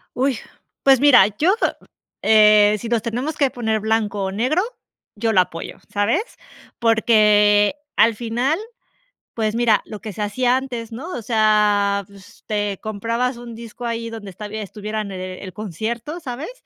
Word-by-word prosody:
¡Uy!, 260 -1 +1 0.5
pues 270 -2 +6
mira, 270 -8 +7
yo 370 +7 +4 0.7
eh, 210 -1 +6
si 235 - -6
nos 235 -1 +1
tenemos 245 +8 -3
que 275 -3 +2
poner 220 -3 -1
blanco 215 -2 -1
o 190 - -3
negro, 255 - +1 0.5
yo 225 +1 0
lo 185 - +6
apoyo, 165 -2 -6
¿sabes?, 210 - +1 0.6
porque 210 -1 +4 0.2
al 230 +1 +5
final, 245 - -1 0.7
pues 215 -1 -1
mira, 230 -2 +3
lo 215 -2 -8
que 215 -3 -7
se 210 - -9
hacía 245 +5 +1
antes, 240 -4 -6
¿no?, 265 +10 -7
o 240 - -6
sea, 210 -2 +2
pues, 200 -2 -17
te 205 -2 -2
comprabas 230 +4 -2
un 240 -1 -9
disco 235 +1 -8
ahí 230 0 -3
donde 220 -3 -8
estab 205 +3 -9
estuviera 215 0 -5
en 200 -2 -5
el 185 0 -7
concierto, 220 - -5
¿sabes?, 270 - -6
220 Hz, 155 wpm, -21 LUFS, 205-240 Hz, 0.7 s, mira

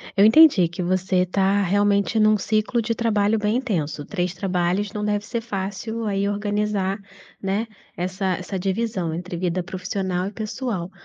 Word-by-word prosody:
Eu 200 - +6
entendi 225 - +7
que 175 +2 -5
você 185 0 +1
tá 195 +2 +2
realmente 200 +3 +2
num 215 0 +5
ciclo 215 +4 0
de 230 +1 -1
trabalho 220 -2 +1
bem 210 +2 +1
intenso. 165 - -2
3 180 -3 -2
trabalhos 190 +1 -1
não 210 0 -4
deve 205 0 -1
ser 235 0 -2
fácil 220 +1 -4
aí 200 -1 0
organizar, 205 -1 -1 0.4
né, 200 +4 -1 0.3
essa 185 +2 -3
essa 185 +1 -5
divisão 190 -3 -1
entre 175 +1 -5
vida 180 0 -1
profissional 185 0 -3
e - - -5
pessoal. 215 -4 -4
200 Hz, 155 wpm, -23 LUFS, 185-215 Hz, 0.4 s, entendi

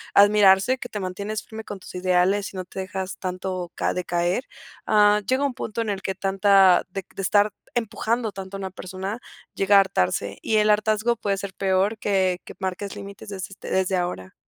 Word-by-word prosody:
admirarse, 205 +4 +6
que 245 - -7
te 210 - -5
mantienes 200 +3 -4
firme 220 -1 -8
con 205 - -7
tus - - -12
ideales 185 +2 +1
y - - -8
no 185 - -4
te 190 - -8
dejas 190 0 -4
tanto 185 -1 -4
ca - - 0
decaer, 175 +5 -1 0.4
ah, 210 0 +5
llega 260 +2 +2
un 275 - -1
punto 230 -2 -4
en 225 - -2
el 195 - -4
que 190 0 -3
tanta 195 -1 +4
de 190 0 -5
de - - -4
estar 205 +2 +3 0.2
empujando 230 -1 -1
tanto 195 0 -7
a - - -8
una 190 -1 -5
persona 190 +4 -6 0.3
llega 200 +1 +4
a - - +9
hartarse, 100 - -1
y 220 - 0
el 210 0 +4
hartazgo 215 +2 +2
puede 200 -3 -1
ser 195 -1 -6
peor 195 +3 +1
que 190 -3 +1
que - - -11
marques 190 +1 -4
límites 200 +1 -9
desde, 190 -2 -5
este, 195 - -9
desde 190 0 +1
ahora. 175 - -3
195 Hz, 200 wpm, -24 LUFS, 185-210 Hz, 0.4 s, a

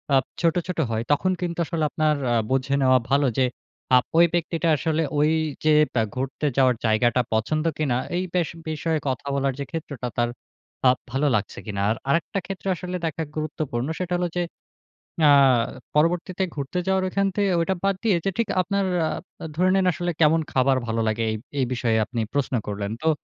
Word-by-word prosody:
আব 130 - +4 0.2
ছোট, 165 0 +3
ছোট 180 -2 -3
হয়, 110 +1 -1
তখন 185 +6 +2
কিন্তু 170 -1 -3
আসলে 160 0 -2
আপনার 155 -1 +1 0.2
আ - - +3
বুঝে 135 +1 +1
নেওয়া 130 -1 +5
ভালো 140 0 +3
যে 130 - +4 0.5
আব 125 - +3
ওই 170 - +8
ব্যক্তিটা 170 0 0
আসলে 160 +2 0 0.2
ঐযে 155 0 +2 0.2
বে 115 - +2
ঘুরতে 135 +3 -2
যাওয়ার 130 -2 +4
জায়গাটা 120 +3 +3
পছন্দ 155 +9 0
কিনা 140 -6 +1 0.2
এই 185 - 0
বেশ 175 -3 +1 0.2
বিষয়ে 155 0 -1
কথা 130 +1 -2
বলার 135 -1 +1
যে - - -1
ক্ষেত্রটা 145 -6 -5
তার 120 0 +2 0.6
আব 125 - +3
ভালো 135 +3 +1
লাগছে 100 -1 -2
কিনা। 100 -2 -3
আর - - 0
আরেকটা 165 +5 +1
ক্ষেত্র 195 0 -7
আসলে 180 +1 -5
দেখা 160 0 -2
গুরুত্বপূর্ণ। 150 -4 -3
সেটা 180 -1 -2
হলো 175 0 0
যে 175 - +2 0.9
আ - - +8 0.6
পরবর্তীতে 175 +4 +1
ঘুরতে 140 +5 -3
যাওয়ার 190 0 +2
ওইখান 195 +1 +1
থেকে 200 -2 +2
ঐটা 190 +3 0
বাদ 195 -1 +2
দিয়ে, 215 -5 +3
যে 195 - +2
ঠিক 230 - +1
"আপনার 200 +2 0 0.2
আ - - -1 0.5
ধরে 185 +3 +3
নিন 190 -1 +3
আসলে 175 0 -2
কেমন 160 +1 +5
খাবার 130 0 +3
ভালো 115 0 0
লাগে?" 110 +1 0
এই - - -2 0.2
এই 130 - +3
বিষয়ে 115 -2 +1
আপনি 115 0 -3
প্রশ্ন 140 -2 -1
করলেন। 100 0 -3
তো 160 - +3
155 Hz, 185 wpm, -24 LUFS, 130-175 Hz, 0.9 s, ওই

